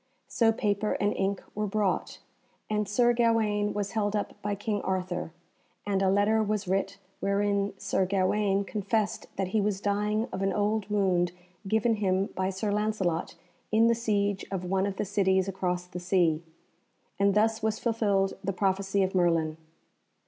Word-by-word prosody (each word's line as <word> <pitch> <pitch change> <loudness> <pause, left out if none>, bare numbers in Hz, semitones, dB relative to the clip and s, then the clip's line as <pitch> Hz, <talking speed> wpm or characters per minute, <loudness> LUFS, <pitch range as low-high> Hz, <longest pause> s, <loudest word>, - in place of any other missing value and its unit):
So 225 -2 +3
paper 210 -1 0
and 205 0 0
ink 195 0 -1
were 210 0 -2
brought, 205 -1 -1 0.5
and 210 -1 0
Sir 240 +3 +3
Gawaine 220 -3 +2
was 205 -1 -3
held 210 -2 0
up 205 - -2
by 205 0 -1
King 205 0 -2
Arthur, 180 -2 -2 0.5
and 195 -2 0
a 190 - +3
letter 205 +3 +3
was 210 -2 -1
writ 195 +1 -1 0.2
wherein 200 0 0
Sir 190 -1 0
Gawaine 195 +1 +1
confessed 210 +1 -1
that 190 -1 -2
he 215 +2 +1
was 200 -1 0
dying 210 +3 0
of 190 - -3
an 195 0 +1
old 210 0 0
wound 185 -4 +1 0.3
given 220 +2 +2
him 195 -1 +1
by 185 0 -1
Sir 195 +2 -2
Lancelot 205 -6 -1 0.4
in 220 +1 +5
the 235 - +5
siege 205 -4 0
of 185 -2 -3
one 190 +2 +1
of 200 - -3
the - - -2
cities 190 -1 +2
across 180 -2 -2
the 180 0 -7
sea, 175 -3 +2 0.8
and 200 0 +3
thus 220 +1 +2
was 220 0 0
fulfilled 205 -5 +1
the 195 +1 -1
prophecy 195 +1 +1
of 190 - -1
Merlin. 165 -4 +2
200 Hz, 165 wpm, -28 LUFS, 190-210 Hz, 0.8 s, in